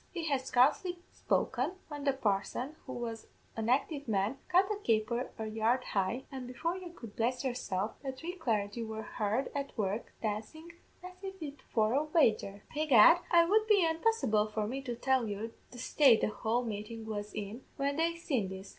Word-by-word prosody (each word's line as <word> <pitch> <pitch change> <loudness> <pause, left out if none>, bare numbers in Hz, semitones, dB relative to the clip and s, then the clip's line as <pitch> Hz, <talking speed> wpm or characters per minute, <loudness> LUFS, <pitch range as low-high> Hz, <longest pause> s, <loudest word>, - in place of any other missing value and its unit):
"He 340 -3 -4
had 275 -3 +1
scarcely 295 +9 +2
spoken, 260 +7 0
when 290 -2 -6
the 275 - +3
parson, 245 +4 -1
who - - -5
was 230 -2 -5 0.3
an 225 0 -2
active 285 +2 +1
man, 210 +4 0
cut 365 +2 +5
a 420 - -1
caper 235 - 0
a 220 - -3
yard 225 +4 +1
high, 200 +6 -1
an' 260 -2 -6
before 320 +8 -2
you 370 -1 -7
could 230 -11 -11
bless 245 +3 0
yourself, 215 -6 -2
the 270 - -3
three 325 +7 -6
clargy 225 - -1
were 220 0 -5
hard 215 +6 -1
at 280 -2 -4
work 210 +1 -2
dancin', 225 +11 -4 0.3
as 365 0 -9
if 325 -8 -6
for 220 0 +2
a 285 +3 +3
wager. 220 -10 +2
Begad, 305 +1 +7
it 340 -1 +6
would 430 +3 +3
be 405 -5 +5
unpossible 320 - +2
for 215 0 -1
me 260 +6 -3
to 245 -3 -4
tell 260 0 +1
you 215 +2 -4 0.2
the 245 - -12
state 250 -1 +5
the - - +2
whole 225 +3 0
meetin' 220 +1 -5
was 210 -1 -4
in 215 +4 -5
when 280 +1 0
they 335 +1 +1
seen 265 - -1
this. 190 +1 -8
250 Hz, 185 wpm, -32 LUFS, 220-305 Hz, 0.3 s, Begad